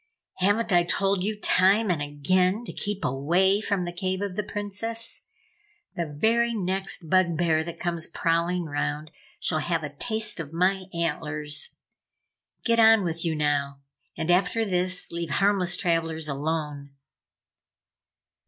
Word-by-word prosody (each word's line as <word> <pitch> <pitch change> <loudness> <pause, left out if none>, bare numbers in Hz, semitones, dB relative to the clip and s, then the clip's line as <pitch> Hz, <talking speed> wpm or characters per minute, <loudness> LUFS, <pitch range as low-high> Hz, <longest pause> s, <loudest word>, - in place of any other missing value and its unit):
Haven't 205 +3 +2
I 175 - +6
told 195 +2 0
you 210 +1 -2
time 195 +2 +3
and 160 -4 -1
again 180 +9 +1
to - - -7
keep 205 -1 -2
away 175 +10 +2
from 200 -4 -1
the 175 - -4
cave 185 +2 -2
of 200 -3 -4
the 210 - 0
Princess? 210 +3 -3 0.7
The 170 -2 -2
very 230 +10 +1
next 190 -3 -2
bug 170 -1 +3
bear 160 -2 +2
that 170 0 -7
comes 170 -2 -1
prowling 170 +1 0
'round 150 0 -3 0.3
shall 155 - +2
have 165 +1 -1
a 145 -1 -6
taste 220 +5 -2
of 155 -1 -6
my 185 +2 +1
antlers! 150 -3 -3 0.9
Get 230 -1 +3
on 225 -2 +7
with 165 -1 -2
you 165 -2 0
now, 140 -2 -1 0.4
and 160 +2 0
after 200 +5 +2
this 180 -2 -1
leave 170 -1 -4
harmless 185 +1 +2
travellers 165 -3 -1
alone!" 145 -1 -3
175 Hz, 145 wpm, -26 LUFS, 160-200 Hz, 0.9 s, on